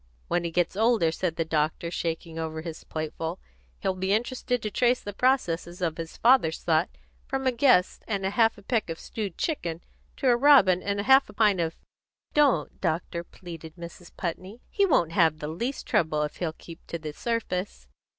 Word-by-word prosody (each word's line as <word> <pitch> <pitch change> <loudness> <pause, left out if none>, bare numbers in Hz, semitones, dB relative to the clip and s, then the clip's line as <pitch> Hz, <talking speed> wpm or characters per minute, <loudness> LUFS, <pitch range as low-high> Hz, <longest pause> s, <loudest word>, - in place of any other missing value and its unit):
"When 175 - +1
he 170 - -1
gets 175 +1 0
a - - -4
little 230 +2 +5
older," 170 -8 +2
said 165 0 -2
the 165 - -1
doctor, 155 +2 -1
shaking 165 -1 -3
over 160 -1 -4
his 165 -2 -7
plateful, 160 +2 -4 0.4
"he'll 190 - 0
be 190 +1 -1
interested 245 +2 -1
to 215 - -2
trace 245 +3 +2
the 205 - -7
processes 180 -9 0
of 165 -3 -1
his 165 -1 -6
father's 235 -10 +3
thought 165 +1 +2 0.4
from 270 0 -2
a 260 - +4
guest 240 -7 +3
and 200 -3 -2
half 225 +3 +2
a 205 - -14
peck 225 -3 0
of 165 - -5
stewed 205 -5 -5
chicken, 175 - -2 0.4
to 270 - -1
a 245 - +6
robin 240 -9 +6
and 200 0 -2
half 265 +5 +5
a - - -11
pint 210 -4 +3
of 165 -1 -1 0.3
" - - -47
"Don't, 295 -3 +2
doctor!" 170 0 -1
pleaded 165 -3 -10
Mrs. 170 0 -10
Putney. 185 +6 -5
"He 400 -1 +3
won't 175 - +3
have 165 -3 +3
the 150 - -5
least 235 - -3
trouble 155 -2 +1
if 150 - -5
he'll 170 -3 -2
keep 165 0 -12
to 170 - -4
the 155 -2 -7
surface." 195 - -3
180 Hz, 200 wpm, -27 LUFS, 165-230 Hz, 0.4 s, a